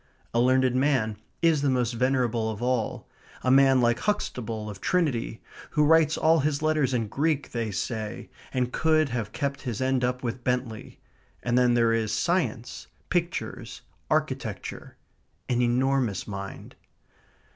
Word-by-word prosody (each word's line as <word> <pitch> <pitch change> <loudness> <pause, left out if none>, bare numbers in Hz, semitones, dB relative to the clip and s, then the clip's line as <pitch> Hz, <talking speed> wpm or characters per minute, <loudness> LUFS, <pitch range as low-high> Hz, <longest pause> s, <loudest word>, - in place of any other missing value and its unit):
A 115 - +2
learned 130 0 +3
man 130 -6 +1 0.3
is 160 -3 +4
the 140 - +2
most 125 -2 +1
venerable 120 -2 +1
of 110 -2 -5
all 125 -3 -1 0.4
a 130 - +2
man 135 -1 +6
like 120 0 +2
Huxtable 115 - -2
of 100 -3 -8
Trinity, 145 -11 0 0.3
who 150 - +2
writes 160 0 +4
all 160 +1 +4
his 145 +1 0
letters 155 -4 +2
in 115 -4 0
Greek, 145 +5 -1
they 115 -2 -2
say, 105 +2 -4 0.2
and 125 -1 -1
could 155 -2 +2
have 115 -4 -3
kept 140 -1 -3
his 120 -6 -4
end 130 -1 +1
up 125 +1 -1
with 120 +1 -4
Bentley. 125 -3 -3 0.4
And 120 0 0
then 125 -1 +4
there 115 -1 +3
is 110 -1 0
science, 125 -4 -1 0.2
pictures, - - -3 0.3
architecture, - - -3 0.5
an 125 -1 +1
enormous 125 -3 +1
mind. 100 -1 -7
125 Hz, 145 wpm, -26 LUFS, 115-140 Hz, 0.5 s, man